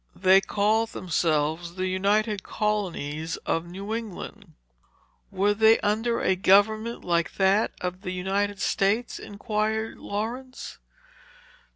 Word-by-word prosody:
They 190 +1 +5
called 215 +3 +1
themselves 165 -1 -1
the 185 0 -2
United 200 +3 +1
Colonies 165 -8 -2
of 165 +1 -1
New 195 +5 -6
England." 225 -5 -7 0.8
"Were 200 +1 +1
they 220 +1 +5
under 225 +3 0
a 190 - +2
government 215 +5 +3
like 170 -1 0
that 195 +2 +3
of 180 +1 -4
the 190 - -5
United 195 +2 -1
States?" 205 +5 0
inquired 215 +1 -2
Laurence. 245 +5 -5
200 Hz, 110 wpm, -26 LUFS, 185-215 Hz, 0.8 s, They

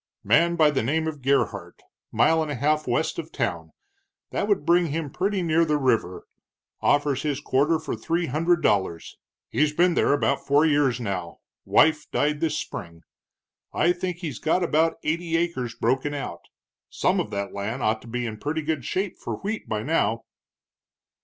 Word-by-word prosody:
"Man 170 +12 +3
by 155 -3 +4
the 140 - 0
name 155 +8 0
of 155 -3 -4
Gerhart, 110 -10 0 0.3
mile 160 0 +3
and 155 - -2
a 145 - -2
half 150 +4 0
west - - 0
of - - -7
town - - -3 0.6
that 205 - -1
would 205 -8 +1
bring 170 +1 +4
him 150 -1 -3
pretty 195 +2 -1
near 165 0 +3
the 155 -2 +1
river 115 -9 0 0.6
offers 145 -2 +2
his 145 -3 -1
quarter 145 +3 +2
for 155 -5 -4
three 165 +10 -1
hundred 165 +5 +1
dollars. 95 -5 0 0.3
He's 150 0 +1
been 175 +1 +4
there - - +2
about 140 -1 +1
four 145 +3 +3
years, 145 -5 +2 0.7
wife 150 -1 +3
died 150 0 0
this 155 -1 0
spring. 85 - -7 0.7
I 175 - +3
think 180 0 -4
he's 160 -9 -5
got 170 +3 +1
about 160 0 +2
eighty 165 +1 0
acres 150 -9 -2
broken 130 +5 0
out. 140 - -6 0.4
Some - - +1
of - - -2
that 100 -1 -4
land 110 +6 -4
ought 110 0 +1
to - - -14
be 120 +1 -3
in 110 -2 -5
pretty 155 +4 -2
good 155 -3 -2
shape 190 - -3
for - - -4
wheat 215 +2 -5
by 105 -1 -2
now." 115 -7 0
150 Hz, 175 wpm, -25 LUFS, 125-165 Hz, 0.7 s, by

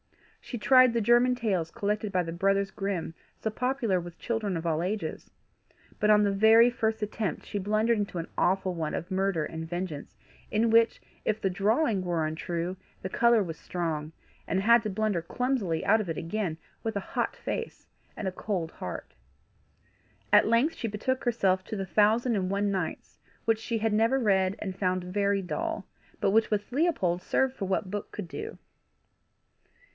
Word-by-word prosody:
She 245 - -5
tried 255 +2 +6
the 235 - +2
German 240 +3 +4
tales 195 -9 -1
collected 210 +3 -2
by 180 -2 +1
the 165 - -5
brothers 195 +2 +1
Grimm, 195 -5 -3 0.3
so 220 - -2
popular 250 -5 0
with 175 0 -9
children 220 -6 -2
of 165 - -5
all 160 -1 +1
ages; 185 -2 -3 0.7
but 210 - +2
on 210 0 +6
the 200 - +2
very 220 +4 +6
first 220 -2 -1
attempt 210 -1 -3
she 205 - -3
blundered 215 +3 +1
into 200 -3 -3
an 165 - -3
awful 190 0 +1
one 160 -3 -3
of 170 - -5
murder 190 -4 +1
and 160 0 -6
vengeance, 175 -4 -5 0.3
in 225 +1 +2
which, 230 0 +4 0.2
if 215 0 0
the 195 -3 0
drawing 210 - +1
was 170 -3 0
untrue, 170 +3 -3 0.3
the 190 - -3
colour 235 +1 +4
was 165 -3 -6
strong, 160 -3 -3 0.4
and 190 - +1
had 235 +3 +6
to 215 - -2
blunder 205 -3 0
clumsily 210 -4 -1
out 220 - +4
of 195 - -5
it 160 - -3
again, 170 -2 -2 0.3
with 225 -1 -2
a 200 - -6
hot - - 0
face 465 - -5 0.3
and 200 - -3
a - - 0
cold 180 -5 -3
heart. 90 - -7 1.2
At - - +7
length 235 +8 +3
she 230 - -3
betook 225 +5 -2
herself 190 -6 +2
to - - -5
the 195 -2 -3
Thousand 220 +5 +3
and 185 -2 -1
One 200 +1 0
Nights, 185 -4 -4 0.3
which 225 -1 +2
she 230 +1 -2
had 220 0 0
never 225 +5 +3
read, 190 -4 +2
and 190 -3 -5
found 185 -2 0
very 200 +2 0
dull, 325 - -3 0.3
but - - +2
which 220 +2 +3
with 210 +1 -2
Leopold 245 - +1
served 265 +5 +1
for 195 - -3
what 190 0 -1
book 205 0 -4
could 205 -4 -6
do. 435 - -7
200 Hz, 180 wpm, -28 LUFS, 180-225 Hz, 1.2 s, At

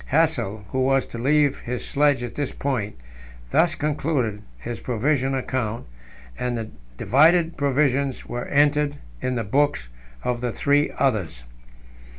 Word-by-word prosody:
Hassel, 140 -10 +1
who 130 - -2
was 135 0 +2
to 115 - -8
leave 145 +2 +2
his 125 0 -5
sledge 145 -3 +2
at 120 - -5
this 145 -2 -2
point, 125 -7 -2 0.6
thus - - +3
concluded 145 -8 -1 0.2
his 115 - -6
provision 135 +2 0
account, 125 -4 -2 0.5
and 125 -1 -1
the 110 -1 -5 0.3
divided 165 - +4
provisions 140 -1 +1
were 120 0 -4
entered 145 0 +2 0.3
in 130 0 -1
the 115 - -1
books 120 - +1 0.3
of 120 -1 -1
the 125 -1 -1
three 145 +4 +2
others. 95 - 0
130 Hz, 140 wpm, -23 LUFS, 120-145 Hz, 0.6 s, divided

